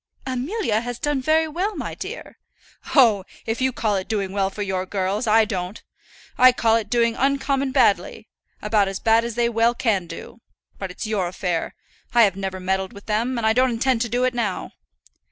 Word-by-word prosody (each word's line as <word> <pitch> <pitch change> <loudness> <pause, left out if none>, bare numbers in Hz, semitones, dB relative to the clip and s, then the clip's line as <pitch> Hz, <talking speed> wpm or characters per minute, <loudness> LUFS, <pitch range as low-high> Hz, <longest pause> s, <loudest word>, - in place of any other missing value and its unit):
"Amelia 260 - -1
has 245 0 -5
done 295 -2 -1
very 315 +3 +2
well, 370 +7 -2
my - - -5
dear." - - -8 0.6
"Oh, 225 -8 +5 0.2
if 225 +2 -2
you 260 0 +2
call 215 -4 0
it 190 - -4
doing 200 -3 -2
well 195 -1 0
for 205 +1 -5
your 190 -1 -2
girls, 200 +4 -1
I 220 +1 +5
don't. 190 -1 -4 0.6
I 255 0 +8
call 225 -2 +2
it 220 -2 -1
doing 235 -1 +2
uncommon 275 0 0
badly; 245 -7 +1 0.4
about 210 -1 +2
as 195 0 -4
bad 225 0 +3
as 235 -1 -4
they 240 0 +2
well 235 +1 +2
can 200 -8 0
do. 230 - -10 0.4
But 195 - -4
it's 180 - -6
your 210 -4 -1
affair. 175 -2 -3 0.4
I 235 - +7
have 195 -3 +3
never 190 -1 -4
meddled 190 +1 -2
with 200 - -12
them, 230 +4 -1
and 220 -1 +2
don't 255 +1 +4
intend 240 0 +1
to 235 - -1
do 245 +2 0
it 255 0 +1
now." 225 -6 -2
225 Hz, 195 wpm, -22 LUFS, 195-250 Hz, 0.6 s, I